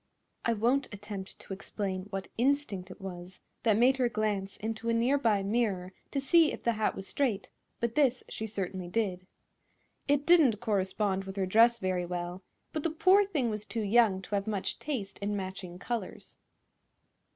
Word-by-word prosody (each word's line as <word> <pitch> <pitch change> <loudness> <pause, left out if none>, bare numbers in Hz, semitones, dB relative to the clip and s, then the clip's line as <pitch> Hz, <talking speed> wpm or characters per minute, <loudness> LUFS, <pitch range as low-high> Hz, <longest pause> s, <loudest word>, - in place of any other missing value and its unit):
I 230 - +3
won't 245 +6 +1
attempt 205 -2 -7
to - - -8
explain 190 -1 -4
what 195 -1 -4
instinct 240 -7 0
it 185 - -11
was 185 -1 -8 0.2
that 220 -3 +3
made 255 +3 +5
her 250 -2 +2
glance 210 -3 -1
into 225 +1 -3
a 230 - +2
near 250 +5 +3
by 215 -6 +2
mirror 195 -4 0 0.2
to 280 - -1
see 320 +3 +5
if - - -7
the 235 - +3
hat 215 -1 0
was 195 - -6
straight, 235 -9 -1 0.3
but 235 -1 -1
this 260 -3 +2
she 220 - -5
certainly 190 -3 -4
did. 185 -2 -1 0.8
It 285 0 +2
didn't 310 -11 +5
correspond 195 -2 0
with 195 0 -7
her 195 -2 0
dress 230 +5 +5
very 185 -4 -1
well, 175 +1 -4 0.3
but 310 - -1
the 330 - 0
poor 370 +6 +5
thing 285 - 0
was 210 -1 -4
too 220 +1 -3
young 205 -3 +4
to 205 - -9
have 200 0 0
much 205 -3 -2
taste 225 -10 -4
in 205 +1 -1
matching 185 -2 -6
colors. 225 0 -5
210 Hz, 180 wpm, -30 LUFS, 190-240 Hz, 0.8 s, made